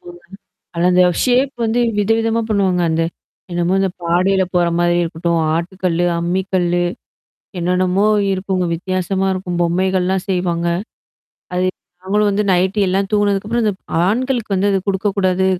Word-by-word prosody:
ஆமாங்க, 175 0 -12 0.5
அதுல 175 +1 +2
அந்த 180 0 +5 0.2
ஷேப் 260 +2 +2
வந்து 225 +2 0 0.2
விதவிதமா 225 +2 +1
பண்ணுவாங்க 190 -4 +1
அந்த. 160 +1 +1 0.5
என்னமோ 175 +1 0
இந்த 195 0 +1
பாடைல 185 +3 +2
போற 175 -1 +3
மாரி 175 0 +2
இருக்கட்டும். 170 0 -1 0.2
ஆட்டு 170 +3 -3
கல்லு, 175 -1 +1
அம்மி 175 +3 0
கல்லு. 175 -1 +1 0.8
என்னென்னமோ 180 +3 +1 0.3
இருக்குங்க 185 -1 -1
வித்தியாசமா 185 +2 -2
இருக்கும். 180 -2 -4
பொம்மைகள்லாம் 185 +2 0
செய்வாங்க. 175 -2 0 0.9
அது 180 +1 +1 0.4
நாங்களும் 205 +2 +1
வந்து 205 +1 0
நைட்டு 185 +3 +1
எல்லாம் 195 +1 0
தூங்குனதுக்கப்புறம் 205 +3 +1
இந்த 210 - +2 0.3
ஆண்களுக்கு 235 +1 0
வந்து 195 +2 +1
அது 195 - +2
குடுக்கக்கூடாது 190 -1 +1
185 Hz, 135 wpm, -18 LUFS, 175-200 Hz, 0.9 s, அந்த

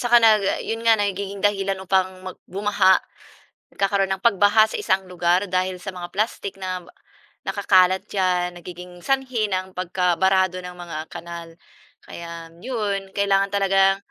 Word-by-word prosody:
Saka 240 0 +4
nag 215 -2 +5 0.2
'yon 225 +1 -3
nga 225 -1 +6
nagiging 200 -1 -2
dahilan 195 -1 -2
upang 190 0 +2 0.2
mag 185 - -6 0.2
bumaha, 200 -2 +4 0.8
nagkakaroon 195 -1 +1
ng 190 - -13
pagbaha 205 0 +5
sa - - -4
isang 190 +1 +1
lugar 175 +1 +2 0.2
dahil 185 0 0
sa 190 - -5
mga 175 0 -6
plastik 205 -1 -2
nab 185 -1 -4 0.6
nakakalat 185 -2 +3
diyan, 180 -2 +1
nagiging 180 0 -10 0.2
sanhi 260 -4 0
ng 185 -1 -1
pagkabarado 185 +1 +1
ng 180 0 -9
mga 165 -3 -6 0.2
kanal, 170 0 -7 0.6
kaya 170 -1 -9
'yon 210 -5 -2 0.2
kailangan 200 0 +2
talagang 195 0 +4
190 Hz, 140 wpm, -23 LUFS, 180-200 Hz, 0.8 s, nga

